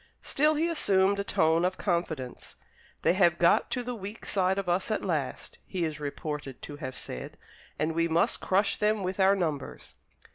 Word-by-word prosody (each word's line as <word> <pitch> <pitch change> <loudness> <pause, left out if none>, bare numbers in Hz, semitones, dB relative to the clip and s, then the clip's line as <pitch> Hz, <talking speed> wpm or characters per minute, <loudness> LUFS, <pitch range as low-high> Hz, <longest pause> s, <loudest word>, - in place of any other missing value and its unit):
Still 305 +2 +2
he 320 +3 +1
assumed 200 - +2
a - - 0
tone 165 -3 +2
of 185 +1 0
confidence. 170 -9 -3 0.5
"They - - +4
have 175 -3 +4
got 170 - +4
to 250 - -2
the 250 +1 -4
weak 205 0 -8
side 190 -1 +1
of 195 -2 -2
us 175 +4 0
at 215 - -1
last," 155 -8 -3
he 180 -3 -1
is 155 -2 -4
reported 150 -2 -5
to 145 - -7
have 130 -3 -6
said, 65 - -7 0.4
"and 155 +1 0
we 165 +1 +1
must 170 +8 +2
crush 200 +1 +2
them 210 -1 +1
with 185 +1 -3
our 195 +1 +5
numbers." 155 -8 -3
180 Hz, 185 wpm, -28 LUFS, 160-200 Hz, 0.5 s, our